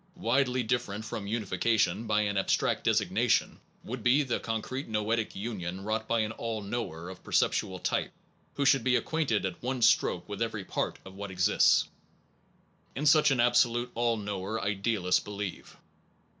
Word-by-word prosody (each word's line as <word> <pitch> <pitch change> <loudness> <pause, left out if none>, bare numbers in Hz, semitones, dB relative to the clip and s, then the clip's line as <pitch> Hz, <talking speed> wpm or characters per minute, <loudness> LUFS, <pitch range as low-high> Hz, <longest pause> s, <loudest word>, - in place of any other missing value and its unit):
Widely 125 +1 +1
different 110 -2 -2
from 110 -3 -5
unification 110 +1 0
by 105 0 +2
an 100 -1 -1
ab 95 - 0
stract - - +1
designation, - - +1 0.2
would 125 +1 -6
be 130 +6 +4
the 125 -4 -1
concrete 115 +4 -4
noetic 110 +1 -1
union 95 -3 -5
wrought 110 +1 -2
by 115 -1 +2
an 110 0 -1
all 110 -1 -4
knower 100 -6 -4
of 95 0 -10
perceptual 95 - +1
type - - -1 0.4
who 140 - 0
should 135 -3 +4
be 130 -1 +3
acquainted 140 -9 0
at 95 -2 -5
one 130 +1 -2
stroke 90 -5 +3
with 105 0 -6
every 110 -4 -2
part - - -2
of 95 - -10
what 100 +1 -7
exists. 95 +2 +3 1.1
In 145 - -2
such 150 0 +6
an 135 -3 +1
ab 120 0 +4
solute 120 0 +2
all 115 -1 +1
knower 100 +1 -3
idealists 100 -2 +1
believe. 100 -2 -6
110 Hz, 165 wpm, -29 LUFS, 100-120 Hz, 1.1 s, such